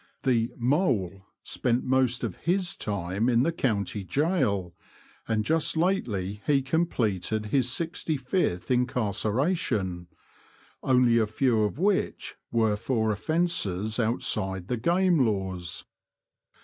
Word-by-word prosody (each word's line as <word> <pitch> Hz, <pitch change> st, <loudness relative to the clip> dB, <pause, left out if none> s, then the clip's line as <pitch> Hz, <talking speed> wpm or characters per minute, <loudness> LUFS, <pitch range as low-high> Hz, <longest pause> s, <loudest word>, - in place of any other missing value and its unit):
The 120 Hz, -3 st, +2 dB
*' -, -, -22 dB
Mole 115 Hz, -, 0 dB
" -, -, -57 dB
spent 120 Hz, +1 st, 0 dB
most 130 Hz, -1 st, +1 dB
of -, -, -2 dB
his 180 Hz, +1 st, 0 dB
time 100 Hz, +2 st, -2 dB
in 120 Hz, 0 st, +3 dB
the 170 Hz, -, +1 dB
county 105 Hz, -, -1 dB
gaol, 115 Hz, -, 0 dB, 0.5 s
and 110 Hz, -2 st, 0 dB
just 160 Hz, 0 st, +1 dB
lately 105 Hz, -, -1 dB
he 140 Hz, -2 st, +3 dB
completed 110 Hz, -, 0 dB
his 125 Hz, +2 st, +1 dB
sixty 160 Hz, 0 st, -2 dB
fifth 130 Hz, -, -1 dB
incarceration 110 Hz, -, 0 dB, 0.4 s
— -, -, -29 dB, 0.2 s
only 125 Hz, -3 st, +4 dB
a 110 Hz, -, +2 dB
few 115 Hz, +1 st, +1 dB
of 105 Hz, +3 st, -1 dB
which 195 Hz, +3 st, 0 dB, 0.2 s
were 110 Hz, -3 st, +2 dB
for 110 Hz, -1 st, 0 dB
offences 110 Hz, -, 0 dB
out 115 Hz, +1 st, 0 dB
side 95 Hz, -3 st, -1 dB
the 125 Hz, -, 0 dB
game 170 Hz, +3 st, +3 dB
laws. 95 Hz, -6 st, -2 dB
115 Hz, 130 wpm, -27 LUFS, 100-140 Hz, 0.5 s, only